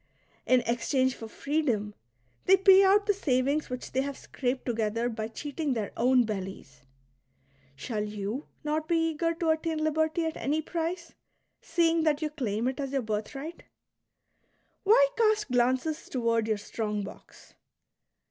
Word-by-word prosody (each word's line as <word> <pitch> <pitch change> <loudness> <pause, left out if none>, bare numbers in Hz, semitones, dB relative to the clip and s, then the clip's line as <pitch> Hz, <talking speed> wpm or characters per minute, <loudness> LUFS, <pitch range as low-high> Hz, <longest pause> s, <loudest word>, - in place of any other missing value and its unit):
'' - - -36
In 255 - +6
exchange 255 +3 +1
for 225 - -8
freedom 240 -6 -1 0.5
they 385 +1 +6
pay 385 0 +7
out 400 +1 +5
the 410 - +3
savings 280 -4 0
which 250 0 -6
they 260 - +1
have 280 0 -4
scraped 255 0 -3
together 230 0 0
by 220 -2 -4
cheating 290 +4 -3
their 215 -3 -3
own 250 +1 +4
bellies; 190 - -6 0.9
shall 215 - -3
ipu 210 +5 -4 0.2
not 305 +1 -1
be 330 -1 +2
eager 330 +2 -1
to 330 -1 -1
attain 320 0 -1
liberty 315 +2 +1
at 320 - -3
any 290 +6 0
price, 335 +2 -4 0.5
seeing 330 -1 +2
that 305 -2 +2
you 310 -1 -2
claim 235 -6 -2
it 260 +1 -2
as 275 -2 -3
your 270 -2 0
birthright 270 +9 -4 0.6
} - - -44
Why - - +6
cast 435 - +2
glances 255 +6 +1
toward 230 -3 0
your 215 -1 +1
strong 210 0 -3
box? 195 - -12
275 Hz, 155 wpm, -28 LUFS, 230-320 Hz, 0.9 s, pay